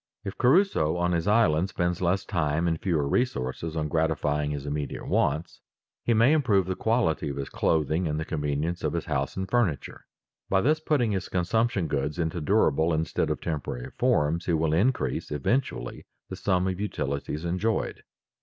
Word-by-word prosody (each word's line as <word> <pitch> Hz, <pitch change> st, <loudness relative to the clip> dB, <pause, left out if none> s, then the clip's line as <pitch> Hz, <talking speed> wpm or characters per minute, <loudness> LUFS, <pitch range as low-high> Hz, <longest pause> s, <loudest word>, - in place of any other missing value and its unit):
If 100 Hz, -2 st, -5 dB
Crusoe 130 Hz, -, +3 dB
on 90 Hz, 0 st, +1 dB
his 85 Hz, +1 st, 0 dB
island 95 Hz, -5 st, +3 dB
spends 90 Hz, -1 st, -1 dB
less 95 Hz, +2 st, +1 dB
time 85 Hz, -3 st, 0 dB
and 80 Hz, -1 st, -1 dB
fewer 80 Hz, -7 st, 0 dB
resources 80 Hz, -, -1 dB
on 75 Hz, -1 st, -1 dB
gratifying 75 Hz, -2 st, 0 dB
his 75 Hz, -1 st, -4 dB
immediate 75 Hz, 0 st, -4 dB
wants, 75 Hz, +4 st, 0 dB, 0.4 s
he 120 Hz, -, +2 dB
may 115 Hz, +7 st, +5 dB
improve 110 Hz, -, +3 dB
the 95 Hz, 0 st, -2 dB
quality 110 Hz, -10 st, +1 dB
of 70 Hz, -, -5 dB
his 70 Hz, -1 st, -4 dB
clothing 80 Hz, +2 st, +1 dB
and 75 Hz, 0 st, -1 dB
the 80 Hz, -, -3 dB
convenience 75 Hz, +3 st, -2 dB
of 75 Hz, -, 0 dB
his 85 Hz, -, -2 dB
house 70 Hz, -1 st, -2 dB
and 95 Hz, 0 st, -2 dB
furniture. 100 Hz, -, -1 dB, 0.4 s
By 95 Hz, 0 st, +3 dB
thus 155 Hz, +7 st, +2 dB
putting 145 Hz, -8 st, +1 dB
his 95 Hz, -2 st, -2 dB
consumption 95 Hz, +2 st, +1 dB
goods 75 Hz, +1 st, -2 dB
into 85 Hz, 0 st, -2 dB
durable 80 Hz, +2 st, +2 dB
instead 80 Hz, +1 st, -1 dB
of -, -, -2 dB
temporary 70 Hz, -6 st, -4 dB
forms, 75 Hz, +4 st, +1 dB
he 85 Hz, -, +2 dB
will 80 Hz, -1 st, +1 dB
increase 95 Hz, -, 0 dB
eventually 75 Hz, -, -2 dB, 0.2 s
the -, -, -5 dB
sum 90 Hz, -1 st, +1 dB
of 95 Hz, 0 st, -2 dB
utilities 75 Hz, -4 st, -3 dB
enjoyed. 95 Hz, +6 st, -1 dB
85 Hz, 175 wpm, -27 LUFS, 75-100 Hz, 0.4 s, may